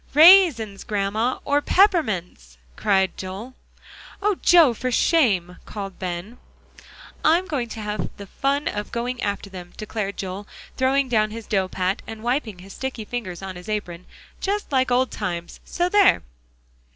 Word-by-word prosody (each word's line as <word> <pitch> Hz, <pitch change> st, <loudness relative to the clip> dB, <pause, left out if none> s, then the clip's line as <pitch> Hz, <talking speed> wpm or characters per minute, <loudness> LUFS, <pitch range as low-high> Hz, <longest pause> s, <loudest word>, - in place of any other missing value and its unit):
"Raisins, 305 Hz, -, +7 dB
Grandma, 210 Hz, +4 st, -1 dB
or 290 Hz, 0 st, +2 dB
peppermints," 215 Hz, -, +1 dB, 0.2 s
cried 190 Hz, -2 st, +1 dB
Joel. 195 Hz, +7 st, -7 dB, 0.7 s
"Oh, 420 Hz, +1 st, +2 dB
Joe, 335 Hz, -8 st, +6 dB
for 255 Hz, +3 st, -3 dB
shame!" 200 Hz, -, +2 dB
called 195 Hz, -3 st, -7 dB
Ben. 185 Hz, +5 st, -5 dB, 0.8 s
"I'm 340 Hz, +4 st, +4 dB
going 270 Hz, -10 st, -3 dB
to 220 Hz, -, -7 dB
have 210 Hz, 0 st, -3 dB
the 200 Hz, -, -8 dB
fun 275 Hz, +8 st, -1 dB
of 210 Hz, 0 st, -4 dB
going 245 Hz, +1 st, -3 dB
after 200 Hz, 0 st, -2 dB
them," 180 Hz, -2 st, -10 dB
declared 210 Hz, -2 st, -4 dB
Joel, 195 Hz, +2 st, -5 dB, 0.3 s
throwing 270 Hz, +1 st, +2 dB
down 215 Hz, -3 st, +2 dB
his 225 Hz, 0 st, -8 dB
dough 190 Hz, -2 st, 0 dB
pat, 185 Hz, +1 st, -2 dB
and 220 Hz, 0 st, -8 dB
wiping 240 Hz, -5 st, -1 dB
his 190 Hz, +2 st, -12 dB
sticky 260 Hz, -4 st, -5 dB
fingers 195 Hz, -7 st, -5 dB
on 190 Hz, -1 st, -6 dB
his 180 Hz, +4 st, -10 dB
apron; 180 Hz, -5 st, -4 dB, 0.3 s
"just 405 Hz, -2 st, -2 dB
like 260 Hz, -2 st, +2 dB
old 250 Hz, +1 st, +2 dB
times 175 Hz, -1 st, -5 dB
so 350 Hz, 0 st, -1 dB
there!" 405 Hz, +1 st, +4 dB
215 Hz, 150 wpm, -23 LUFS, 190-265 Hz, 0.8 s, Raisins